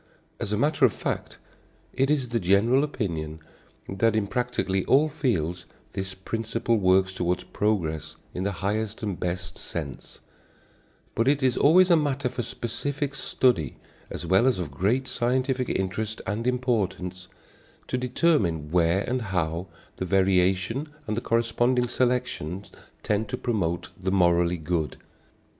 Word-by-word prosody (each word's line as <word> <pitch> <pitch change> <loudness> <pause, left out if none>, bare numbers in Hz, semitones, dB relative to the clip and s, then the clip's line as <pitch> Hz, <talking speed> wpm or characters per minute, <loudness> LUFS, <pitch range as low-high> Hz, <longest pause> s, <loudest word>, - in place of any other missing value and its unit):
As - - -3
a 105 - +1
matter 150 +4 +1
of 120 -6 +6
fact, - - -4 0.6
it 135 +1 +1
is 140 -5 +1
the 115 0 0
general 105 +8 +4
opinion 80 - -3 0.5
that 110 +3 +1
in 110 -2 +2
practically 100 -4 -1
all 150 +4 +4
fields 90 - -1 0.2
this 95 -1 -4
principle 115 +3 -1
works 95 0 +3
toward 90 -1 -1
progress 85 -7 -1 0.2
in 90 - -4
the 100 +2 0
highest 110 +2 -1
and 100 -4 -3
best 90 0 -3
sense; 75 -7 -6 0.9
but 115 - +1
it 140 0 +3
is 130 -2 +3
always 180 +5 +6
a - - +8
matter 140 -4 0
for 120 - -3
specific 140 +6 -3
study 125 - +1 0.3
as - - -6
well 95 +7 +4
as 130 - +3
of 85 -6 -4
great 110 - 0
scientific 130 +1 0
interest 105 +4 -2
and 110 +5 -2
importance, 100 -8 -1 0.6
to - - -2
determine 120 - +1
where 85 +2 +3
and 125 +4 -1
how 85 -1 -1 0.3
the 95 - -2
variation 95 - +2 0.2
and 105 - -2
the 120 - -2
corresponding 120 +2 +2
selection 125 -8 -1 0.4
tend 105 +1 0
to - - -2
promote 90 -7 -1
the 95 0 -1
morally 85 -2 +3
good. 80 -1 -2
105 Hz, 145 wpm, -26 LUFS, 90-125 Hz, 0.9 s, a